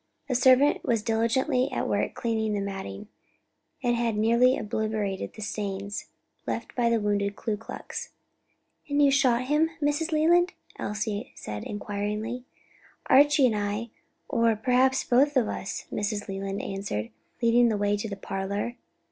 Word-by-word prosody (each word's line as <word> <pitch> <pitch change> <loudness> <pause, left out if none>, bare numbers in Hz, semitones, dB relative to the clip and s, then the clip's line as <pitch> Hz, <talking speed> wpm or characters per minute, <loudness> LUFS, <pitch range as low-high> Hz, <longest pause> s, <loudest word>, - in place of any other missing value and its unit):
A - - +1
servant 260 +3 +5
was 230 -3 +1
diligently 250 +4 +1
at - - -1
work - - 0
cleaning 220 -2 -1
the 205 - 0
matting, 195 - -5 0.8
and 240 0 +2
had 235 -2 0
nearly 235 +4 +4
obliterated 215 -2 -2
the 215 - -6
stains 200 -1 -4 0.4
left - - -4
by 240 -2 +2
the 230 -1 +2
wounded 205 -1 0
Ku 220 +1 -2
Klux. 225 - -7 0.8
"And 285 0 +1
you 285 -1 +6
shot 255 -3 +3
him, 300 +5 +2
Mrs. 295 +3 0
Leland?" 345 +4 +4 0.3
Elsie 215 +2 -3
said 105 -1 -6
inquiringly. 210 +4 -3 0.7
"Archie 285 -3 +6
or - - -1
I, 205 +3 -2 0.4
or 230 -1 +2
perhaps 255 +4 +2
both 275 +3 +3
of 235 -4 +3
us," 195 - -4
Mrs. 205 0 -2
Leland 195 0 -4
answered, 195 - -4 0.3
leading 235 0 +4
the 215 - 0
way 205 0 +1
to 210 +2 -4
the 200 - -5
parlor. 200 +5 -3
225 Hz, 150 wpm, -27 LUFS, 205-255 Hz, 0.8 s, you